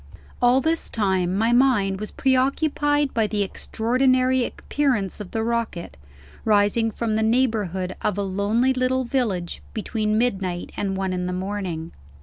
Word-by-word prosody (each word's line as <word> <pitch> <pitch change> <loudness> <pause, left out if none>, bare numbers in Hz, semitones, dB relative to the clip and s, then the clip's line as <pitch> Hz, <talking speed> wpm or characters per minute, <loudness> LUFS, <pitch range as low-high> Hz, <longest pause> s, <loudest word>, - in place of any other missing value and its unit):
All 245 +2 +5
this 320 +2 0
time 190 -4 0
my 225 +3 +2
mind 235 -7 +3
was 215 - -5
pre 265 -1 +1
occupied 290 +2 +1
by 225 -3 +2
the 205 0 0
extraordinary 255 +5 +1
appearance 240 -8 -1
of 205 -3 -7
the 225 - -2
rocket, 230 -7 -2 0.5
rising 210 +2 +3
from 225 0 -2
the 220 - +1
neighborhood 220 -6 0
of 205 - -1
a 200 - 0
lonely 205 +7 +1
little 255 0 +1
village 225 -9 -2
between 215 -1 -1
midnight 190 -7 -1
and 195 -1 -2
one 190 -1 -1
in 180 0 -2
the 180 - -2
morning. 185 -4 -4
220 Hz, 150 wpm, -23 LUFS, 195-255 Hz, 0.5 s, All